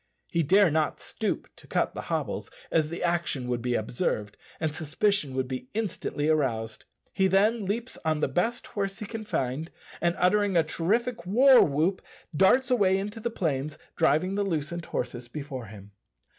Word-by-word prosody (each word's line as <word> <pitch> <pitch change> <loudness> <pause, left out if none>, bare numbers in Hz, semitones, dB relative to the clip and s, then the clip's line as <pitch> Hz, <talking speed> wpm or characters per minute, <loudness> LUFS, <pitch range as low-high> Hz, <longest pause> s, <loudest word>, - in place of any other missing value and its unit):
He 170 - +2
dare 190 +3 +5
not 155 0 0
stoop - - -3
to - - -14
cut - - 0
the - - -5
hobbles, - - -2 0.2
as 155 -2 +2
the 170 - -5
action 170 -7 0
would 120 -1 -1
be 125 0 0
observed, 105 -2 -2 0.2
and 160 -2 -1
suspicion 160 -1 0
would 130 -1 0
be 125 -1 -5
instantly 190 -8 -2
aroused. 115 -8 0 0.3
He 190 - +3
then 205 +3 +3
leaps 230 +5 -3
on 155 -1 +1
the - - +2
best 200 - -1
horse 195 -2 -3
he 215 - -6
can 220 +1 -6
find, 135 -1 -2 0.3
and 170 0 +2
uttering 200 +1 +3
a 165 - +5
terrific 190 +5 -1
war 255 +6 +7
whoop 160 +6 +1 0.3
darts 250 - +4
away 195 -6 +4
into 205 +3 -4
the 235 +2 -2
plains, 155 - -2 0.2
driving 165 +3 +2
the 205 +1 +1
loosened 170 -2 -2
horses 120 -1 -4
before 135 -2 -6
him. 100 -1 -12
170 Hz, 170 wpm, -27 LUFS, 140-200 Hz, 0.3 s, war